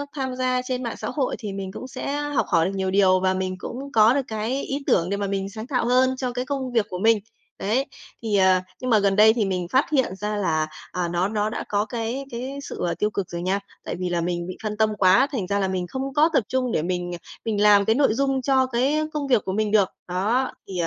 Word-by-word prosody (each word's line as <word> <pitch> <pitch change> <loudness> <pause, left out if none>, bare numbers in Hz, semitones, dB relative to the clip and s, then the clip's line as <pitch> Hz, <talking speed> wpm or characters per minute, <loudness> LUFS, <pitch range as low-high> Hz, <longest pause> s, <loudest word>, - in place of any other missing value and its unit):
tham 260 -2 -3
gia 255 0 0
trên 255 0 -2
mạng 235 - -4
xã - - -5
hội 275 -4 -1
thì 210 -4 -5
mình 195 -1 -5
cũng 255 - -7
sẽ 280 +2 -4
học 290 -3 0
hỏi 165 -3 +3
được 190 - -1
nhiều 190 -1 -1
điều 190 -1 +4
và 185 0 +2
mình 185 0 -2
cũng 270 +9 -7
có 220 +1 +6
được 280 - +2
cái 225 +4 -2
ý 275 +1 -3
tưởng 170 0 +3
để 200 - -1
mà 200 0 -2
mình 195 0 -2
sáng 220 +3 -7
tạo 255 -4 0
hơn 255 +1 +3
cho 255 -1 -2
cái 250 +1 -2
công 265 -1 -3
việc 230 -3 +2
của 180 - -5
mình, 225 +2 +4 0.4
đấy! 235 +7 +1 0.4
Thì 215 -3 +1
ờ, 190 -1 +5 0.2
nhưng 255 - -3
mà 220 -3 +5
gần 200 -1 +2
đây 215 +2 +7
thì 225 -3 0
mình 180 -2 -2
phát 265 +3 +4
hiện 260 -10 +1
ra 210 +2 -3
là, 160 -6 0 0.2
à, 180 -1 -1
nó 175 +2 0
nó 210 0 -1
đã 220 - -4
có 205 0 +1
cái 235 +4 -3
cái 260 +4 -5
sự, - - -7
gọi - - 0
là, - - 0
tiêu 210 - 0
cực 200 -3 -4
rồi 170 0 -4
nha, 190 +3 0 0.2
tại - - -4
vì 180 -1 -2
là 175 -1 0
mình 175 0 -2
bị 185 - -6
phân 210 -1 -3
tâm 220 0 +3
quá, 195 +7 +5
thành 215 -10 -2
ra 200 +1 0
là 195 - +1
mình 185 -1 -2
không 265 +5 -4
có 305 +3 +4
tập 260 - +3
trung 255 -2 0
để - - +1
mình 175 +1 -2 0.3
mình 215 -2 0
làm 205 -1 +6
cái 220 - +3
nội 275 -4 +3
dung 270 +2 0
cho 265 0 +3
cái 260 +4 +1
công 295 -2 -2
việc 245 -5 +3
của 190 - -2
mình 210 +1 0
được. 205 -3 +4 0.2
Đó, 210 +9 0 0.2
thì, 195 - -8
215 Hz, 270 wpm, -24 LUFS, 190-255 Hz, 0.4 s, đây